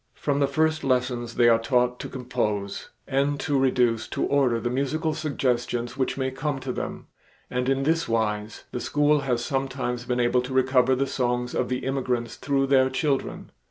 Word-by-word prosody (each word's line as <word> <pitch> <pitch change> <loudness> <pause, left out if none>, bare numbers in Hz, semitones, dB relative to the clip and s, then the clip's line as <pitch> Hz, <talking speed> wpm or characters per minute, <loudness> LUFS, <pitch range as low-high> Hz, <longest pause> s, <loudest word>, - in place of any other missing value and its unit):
From 145 -1 -1
the 140 - +3
first 155 +2 +1
lessons 125 -3 0
they 120 - +5
are 115 -1 +5
taught 125 0 +1
to - - -6
compose 105 -6 -3 0.2
and 140 +1 +1
to 140 -2 +1
reduce 125 -4 +2
to - - -2
order 130 -5 +2
the 120 +1 -2
musical 150 +5 -1
suggestions 125 -6 -1
which 135 -1 -1
may 130 -1 -1
come 135 +2 -2
to 130 - -3
them, - - -5 0.5
and 125 +1 0
in 135 0 +1
this 165 +3 +1
wise 105 -1 -1
the - - -3
school 145 +3 +2
has 125 -3 -1
sometimes 130 -3 -2
been 125 0 -1
able 125 +1 +3
to 125 +1 -6
recover 130 0 +3
the 135 +2 +1
songs 125 -2 -1
of 125 - -1
the 125 0 -2
immigrants 125 -3 -1
through 140 -1 0
their 130 -1 +4
children. 135 +1 -2
130 Hz, 185 wpm, -25 LUFS, 120-140 Hz, 0.5 s, they